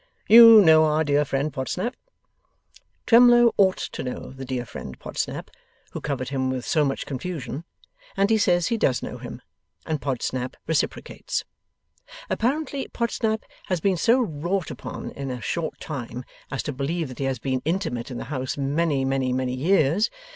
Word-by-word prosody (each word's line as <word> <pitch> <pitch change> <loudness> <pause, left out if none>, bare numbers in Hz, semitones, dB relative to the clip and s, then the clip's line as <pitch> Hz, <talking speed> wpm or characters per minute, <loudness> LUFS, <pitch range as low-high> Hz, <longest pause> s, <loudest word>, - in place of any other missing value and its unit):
You 230 -1 +10
know 160 -3 +6
our 155 +1 +2
dear 145 -1 +2
friend 140 +2 -2
Podsnap?' 180 - -3 1.1
Twemlow 240 0 +6
ought 190 -2 +3
to - - -5
know 125 - -6
the 135 0 -8
dear 125 -1 -3
friend 65 - -8
Podsnap - - -4 0.4
who - - -6
covered 130 -4 -3
him 130 -1 -1
with 130 -1 -3
so 155 - +2
much 135 -1 -2
confusion, 145 +1 -5 0.5
and 200 +2 +2
he 220 - +4
says 175 -4 +2
he 230 - 0
does 130 - +1
know - - -6
him, - - -9 0.4
and 155 -2 -2
Podsnap 130 -1 -3
reciprocates. 160 -2 -2 0.9
Apparently, 275 +2 -1
Podsnap 225 -2 -1 0.2
has 180 -2 0
been 190 +3 +1
so 235 +8 +3
wrought 175 - -2
upon - - -7
in 140 -1 -6
a 125 -1 -4
short 165 +5 -3
time, 125 -4 -6 0.3
as 135 - -3
to 145 - -4
believe 150 +5 -2
that 130 - -10
he 135 - -1
has 135 -1 -1
been 130 +1 -2
intimate 160 -8 -2
in 125 - -6
the - - -5
house 130 0 -3
many, 140 0 0
many, 135 -1 0
many 130 0 -1
years. 160 - +2
150 Hz, 170 wpm, -24 LUFS, 130-195 Hz, 1.1 s, You